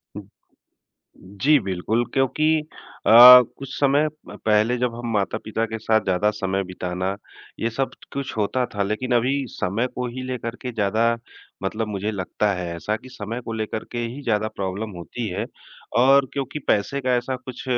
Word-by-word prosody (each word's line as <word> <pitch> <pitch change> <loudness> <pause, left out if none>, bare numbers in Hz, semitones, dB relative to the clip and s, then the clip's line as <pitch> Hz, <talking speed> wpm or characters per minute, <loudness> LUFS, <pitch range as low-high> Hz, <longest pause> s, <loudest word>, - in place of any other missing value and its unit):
उ, 105 - -5 1.0
जी। 100 +11 +2
बिल्कुल, 100 +5 -1
क्योंकि 155 +4 +2 0.5
अ, - - +4 0.5
कुछ 135 -1 -7
समय 145 +2 +3 0.2
प - - -9
पहले 110 +3 +3
जब 125 -2 -1
हम 120 0 -6
माता-पिता 110 +2 -1
के 110 0 -5
साथ 110 +1 +2
ज़्यादा 95 +3 +2
समय 95 -1 -2
बिताना, 90 +1 -3 0.5
ये 115 - 0
सब 135 +4 -1 0.2
कुछ 140 -4 -4
होता 110 +4 0
था, 100 - 0
लेकिन 110 +5 -2
अभी 125 +3 +2 0.2
समय 105 +8 -1
को 125 0 -2
ही 130 - -5
लेकर 120 -2 -4
के 125 -1 -4
ज़्यादा 115 +2 +1 0.5
मतलब 110 +3 -2
मुझे 105 0 -2
लगता 105 +1 -1
है 90 -2 -4
ऐसा 105 +6 -2
कि 130 +4 -14
समय 115 +1 -5
को 115 - -5
लेकर 110 0 -3
के 120 - -3
ही 120 +4 -4
ज़्यादा 110 -3 0
प्रॉब्लम 100 +3 -3
होती 115 +7 -5
है। 100 +3 -3 0.6
और 135 +1 +5
क्योंकि 140 +1 -3
पैसे 120 +7 +1
का 130 -2 +1
ऐसा 125 +2 -2
कुछ 130 0 -9
110 Hz, 170 wpm, -23 LUFS, 100-125 Hz, 1.0 s, और